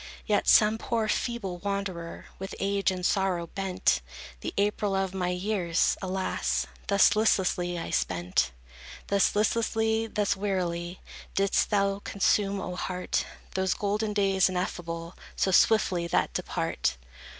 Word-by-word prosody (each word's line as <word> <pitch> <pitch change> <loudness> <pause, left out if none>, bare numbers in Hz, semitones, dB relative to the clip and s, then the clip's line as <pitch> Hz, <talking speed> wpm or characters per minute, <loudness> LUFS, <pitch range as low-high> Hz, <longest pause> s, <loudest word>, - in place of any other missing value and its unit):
As 210 - +3
some 215 +1 +5
poor, 225 -2 -1
feeble 210 -5 -2
wanderer, 195 -3 -4
With 195 0 -6
age 200 0 +1
and 185 -1 -3
sorrow 190 -4 +1
bent, 190 +1 0 0.4
The - - -4
April 205 0 +1
of 190 -1 -1
my 180 -2 -1
years, 180 -2 +1
alas, 190 0 -1 0.2
Thus 200 0 +5
listlessly 180 -4 +1
I 165 - -5
spent; 90 0 0 0.6
Thus 200 0 +3
listlessly, 220 +1 +1
thus 210 -2 0
wearily, 180 -3 -2 0.3
Didst 195 0 +2
thou 200 -1 +1
consume, 200 0 +1
O 180 -1 -4
heart, 180 0 -2 0.3
Those 190 -1 +1
golden 210 +1 -1
days, 195 -2 +3
ineffable, 170 -2 -4 0.2
So 190 - +1
swiftly 185 -3 +3
that - - +1
depart. 65 - -1
195 Hz, 130 wpm, -28 LUFS, 180-205 Hz, 0.6 s, some